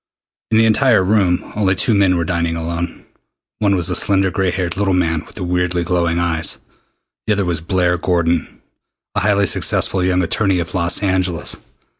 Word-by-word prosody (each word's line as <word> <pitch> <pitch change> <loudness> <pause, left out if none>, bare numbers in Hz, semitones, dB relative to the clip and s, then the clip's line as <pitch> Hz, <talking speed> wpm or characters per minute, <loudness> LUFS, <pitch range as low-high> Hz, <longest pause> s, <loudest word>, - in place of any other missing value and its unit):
In 110 - +2
the 115 - +5
entire 110 -1 +4
room 95 -3 +1
only 100 -2 +1
two 110 +5 +2
men 95 -3 +3
were 85 - -1
dining 85 -1 -1
alone. 85 +1 -5 0.5
One 100 -2 +2
was 90 -3 +1
the - - -1
slender 95 -1 +1
gray 95 +1 0
haired 90 -1 -3
little 95 -2 0
man 80 -3 0
with - - -12
the 100 - -5
weirdly 90 0 -1
glowing 85 -1 0
eyes. 85 -2 -1 0.7
The 110 - +3
other 100 -2 -1
was 85 -3 -2
Blair 90 0 0
Gordon, 85 -3 -1 0.5
a - - 0
highly 100 0 +2
successful 95 0 +1
young 90 0 +1
attorney 95 +2 0
of 85 -2 -4
Los 90 +2 +1
Angeles. 95 -3 -1
90 Hz, 180 wpm, -18 LUFS, 85-100 Hz, 0.7 s, the